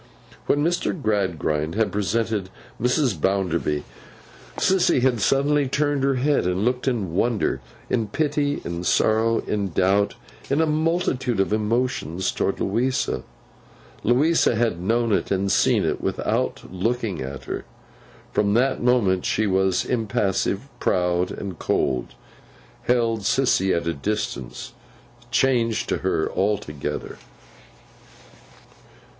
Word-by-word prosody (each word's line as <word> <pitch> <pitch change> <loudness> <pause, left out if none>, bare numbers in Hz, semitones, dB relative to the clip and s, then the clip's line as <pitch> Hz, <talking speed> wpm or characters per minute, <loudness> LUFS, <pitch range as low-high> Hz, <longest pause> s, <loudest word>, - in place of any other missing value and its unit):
When 145 +1 +2
Mr. 175 +1 0
Gradgrind 85 - -1
had 110 0 +1
presented 105 0 -1 0.3
Mrs. 125 - +1
Bounderby, 85 -6 0 0.7
Sissy 185 -8 +3
had 125 -4 +2
suddenly 140 +4 +2
turned 145 0 0
her 135 0 +2
head, 140 -5 +1
and 90 +3 0
looked, 125 +2 0
in 105 -10 -1
wonder, 115 +4 0 0.3
in 115 -3 0
pity, 145 +3 -1
in 85 0 -4
sorrow, 110 +5 +2
in 100 -2 -1
doubt, 95 +4 +2 0.3
in 140 - +2
a 160 - +4
multitude 155 - 0
of 95 +2 +1
emotions, 105 - 0
towards - - -1
Louisa. 125 +6 0 0.8
Louisa 135 +3 +3
had 110 -6 0
known 115 +4 +1
it, - - +1
and 95 0 0
seen - - +3
it, - - -1
without - - -1
looking 110 - -1
at 65 +1 -6
her. - - -5 0.7
From 100 0 +1
that 130 +3 +2
moment 115 -7 +2
she 110 - +1
was 95 -1 +1
impassive, 105 -1 0
proud 90 0 +1
and 95 -5 -6
cold—held 70 - -2
Sissy 100 -4 +2
at 85 - -3
a 85 - 0
distance—changed 115 - -2
to - - +1
her 95 -4 0
altogether. 95 -8 -2
110 Hz, 115 wpm, -23 LUFS, 95-125 Hz, 0.8 s, a